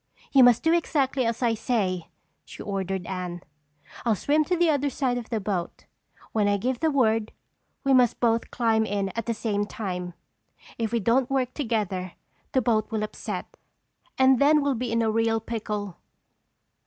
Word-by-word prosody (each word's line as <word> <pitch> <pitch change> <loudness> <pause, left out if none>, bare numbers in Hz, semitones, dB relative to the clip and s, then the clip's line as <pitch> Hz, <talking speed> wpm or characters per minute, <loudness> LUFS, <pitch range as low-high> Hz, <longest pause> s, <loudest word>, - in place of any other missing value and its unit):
"You 270 -2 +7
must 245 -2 +5
do 325 - +4
exactly 275 -6 +1
as 230 +2 -2
I 235 -1 +3
say," 195 -7 -1 0.4
she - - -10
ordered 190 -2 -3
Anne. 180 -2 -5 0.6
"I'll 230 -3 +2
swim 300 +9 +2
to 360 - 0
the 345 0 +3
other 285 -1 +1
side 255 -3 -1
of 235 - -10
the 225 - -1
boat. 190 -4 -4 0.5
When 210 -2 +1
I 205 0 +2
give 245 +4 -2
the 320 - +2
word 225 -6 +2 0.5
we 275 - +3
must 250 -3 +4
both 230 -1 +1
climb 225 -2 +2
in 200 -2 -1
at 230 +5 -5
the 230 - 0
same 205 -2 -1
time. 180 -5 -5 0.6
If 225 -1 -1
we 235 - +1
don't 240 +4 +2
work 260 -2 0
together, 205 - -2 0.4
the 260 - +2
boat 220 -2 +1
will 220 -2 -2
upset 215 - -6 0.6
and 260 -1 +5
then 295 +1 +5
we'll 285 -1 +1
be 245 -1 -3
in 230 0 +1
a 220 - +1
real 225 0 +1
pickle!" 210 -4 -4
225 Hz, 180 wpm, -26 LUFS, 205-255 Hz, 0.6 s, You